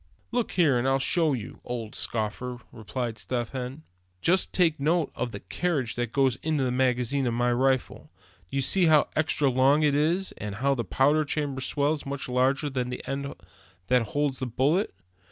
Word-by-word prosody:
"Looky 230 -7 +1
here, 135 -6 +3
and 125 - 0
I'll 135 0 +3
show 155 +3 +2
you, 120 -5 -6
old 115 -3 -5
scoffer," 120 +3 -3
replied 115 0 -4
Step 120 +3 -3
Hen. 130 +3 -5 0.4
"Just 180 - +2
take 165 -5 +2
note 160 +2 +1
of 125 -1 -3
the 100 - -7
cartridge 150 -10 -1
that 120 -2 -3
goes 135 -2 +2
in 155 +2 -1
the 130 -3 +1
magazine 125 +1 +1
of 115 - 0
my 120 +1 +2
rifle. 130 +1 0 0.4
Do - - -7
you 135 - +1
see 180 +7 +3
how 155 -2 +5
extra 150 -2 +1
long 135 +4 +4
it 145 -2 +3
is, 165 +6 +1
and 105 -1 -5
how 135 +6 +1
the 120 -3 -2
powder 145 +9 +2
chamber 145 -2 -2
swells 145 +2 0
much 140 0 -5
larger 130 +3 +1
than 125 -2 -2
the 125 - -6
end 140 +1 -4 0.5
that 125 0 +4
holds 145 +1 -1
the 130 - -2
bullet? 140 - +1
135 Hz, 190 wpm, -27 LUFS, 125-150 Hz, 0.5 s, how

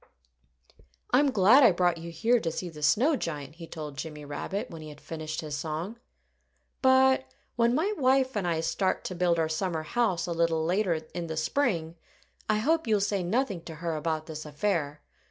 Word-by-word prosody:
"I'm 280 +3 +4
glad 225 +4 +6
I 240 -6 +7
brought 175 -1 +1
you 170 +1 -7
here 225 +9 +2
to 165 -6 -2
see 175 +2 -4
the 150 -2 -11
snow 250 - +3
giant," 150 - -5
he 165 -1 -9
told 150 -4 -7
Jimmy 150 -2 -6
Rabbit, 185 +8 -4
when 165 -1 -8
he 155 - -8
had 150 -1 -12
finished 155 -1 -5
his 150 -2 -5
song. 160 +9 -4 0.8
"But 260 0 +5 0.3
when 235 0 +3
my 370 +9 +1
wife 265 - +2
and 195 -4 -1
I 165 -2 0
start 175 +4 0
to - - -4
build 175 -1 +1
our 160 -1 +1
summer 160 0 -2
house 205 0 0
a 175 - -4
little 165 -1 +1
later 180 0 +1 0.2
in 175 -1 -4
the 160 -1 -5
spring, 170 - 0 0.5
I 215 - +3
hope 315 +6 +1
you'll 215 -2 +3
say 200 -1 0
nothing 200 0 -1
to 165 - -7
her 165 0 -3
about 155 0 -2
this 155 -1 -7
affair. 150 -1 -2
175 Hz, 190 wpm, -28 LUFS, 160-225 Hz, 0.8 s, I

